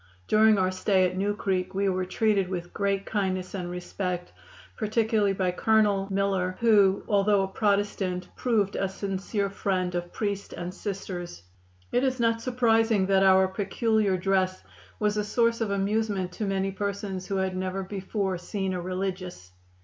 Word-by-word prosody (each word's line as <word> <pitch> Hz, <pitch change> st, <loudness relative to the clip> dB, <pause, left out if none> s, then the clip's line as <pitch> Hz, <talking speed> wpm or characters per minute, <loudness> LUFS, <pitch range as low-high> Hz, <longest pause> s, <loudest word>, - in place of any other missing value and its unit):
During 215 Hz, 0 st, +5 dB
our 185 Hz, -1 st, +2 dB
stay 185 Hz, 0 st, +2 dB
at 180 Hz, -, -5 dB
New 200 Hz, +2 st, 0 dB
Creek 190 Hz, -2 st, -2 dB
we 200 Hz, +1 st, +1 dB
were 185 Hz, -1 st, 0 dB
treated 200 Hz, -2 st, +1 dB
with 175 Hz, -2 st, -5 dB
great 200 Hz, -1 st, 0 dB
kindness 185 Hz, -3 st, -2 dB
and 180 Hz, -3 st, -4 dB
respect, 180 Hz, 0 st, -4 dB, 0.4 s
particularly 215 Hz, -2 st, +1 dB
by 185 Hz, -2 st, 0 dB
Colonel 205 Hz, 0 st, +2 dB
Miller, 195 Hz, -2 st, 0 dB
who, 205 Hz, -4 st, +4 dB
although 205 Hz, -1 st, +3 dB
a -, -, -1 dB
Protestant, 200 Hz, -3 st, 0 dB
proved 215 Hz, -5 st, +1 dB
a 195 Hz, -, 0 dB
sincere 195 Hz, +1 st, -2 dB
friend 185 Hz, -3 st, -1 dB
of 175 Hz, 0 st, -3 dB
priest 200 Hz, -2 st, -3 dB
and 175 Hz, +1 st, -5 dB
Sisters. 185 Hz, -, -6 dB, 0.5 s
"It 245 Hz, -, +2 dB
is 260 Hz, -1 st, 0 dB
not 230 Hz, -1 st, +2 dB
surprising 225 Hz, -4 st, +2 dB
that 195 Hz, 0 st, +3 dB
our 190 Hz, 0 st, +6 dB
peculiar 205 Hz, 0 st, 0 dB
dress 185 Hz, 0 st, 0 dB, 0.3 s
was 210 Hz, 0 st, 0 dB
a 210 Hz, -, +1 dB
source 230 Hz, +2 st, +1 dB
of 220 Hz, -, 0 dB
amusement 200 Hz, -1 st, 0 dB
to 210 Hz, -, -4 dB
many 195 Hz, 0 st, 0 dB
persons 195 Hz, -1 st, -4 dB
who 195 Hz, -, -2 dB
had 190 Hz, -1 st, -1 dB
never 185 Hz, +1 st, -2 dB
before 190 Hz, -1 st, -3 dB
seen 190 Hz, +1 st, -3 dB
a 180 Hz, -, -3 dB
religious. 185 Hz, -, -4 dB
195 Hz, 160 wpm, -27 LUFS, 185-210 Hz, 0.5 s, our